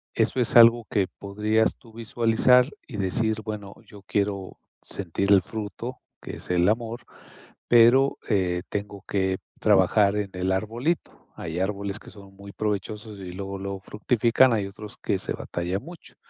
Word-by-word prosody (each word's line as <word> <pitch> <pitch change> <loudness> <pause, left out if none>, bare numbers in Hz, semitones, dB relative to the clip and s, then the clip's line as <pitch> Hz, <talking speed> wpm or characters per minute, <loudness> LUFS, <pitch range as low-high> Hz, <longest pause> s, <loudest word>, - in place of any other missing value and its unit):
eso - - +1
es 120 - 0
algo 115 0 +7
que 100 -3 +1
podrías 105 +2 +1
tú 115 -4 -18
visualizar 115 +3 +3 0.2
y 120 - -7
decir: 110 +3 0
"Bueno, 105 -2 -6
yo 100 - -14
quiero 100 -1 -2 0.2
sentir 100 +1 -3
el 100 - +7
fruto 110 +4 -6 0.2
que - - -7
es - - -11
el 90 0 +3
amor, 115 +1 -2 0.7
pero, 120 +4 +5
eh, 90 -4 +1
tengo 100 -1 -5
que 95 -1 0 0.2
trabajar 100 0 +4
en 105 -1 -2
el 90 +1 -1
arbolito". 115 - -2
Hay 80 +1 -5
árboles 100 +1 -2
que - - -14
son 100 -2 -14
muy 100 0 -12
provechosos 105 +1 -4
y 90 -2 -7
luego 95 +1 -5
lo 100 0 -5
fructifican. 120 +4 +2
Hay 105 -3 0
otros 105 +1 -10
que - - -1
se - - -3
batallan 90 +4 -4
mucho, 170 +2 -13
105 Hz, 160 wpm, -25 LUFS, 95-115 Hz, 0.7 s, algo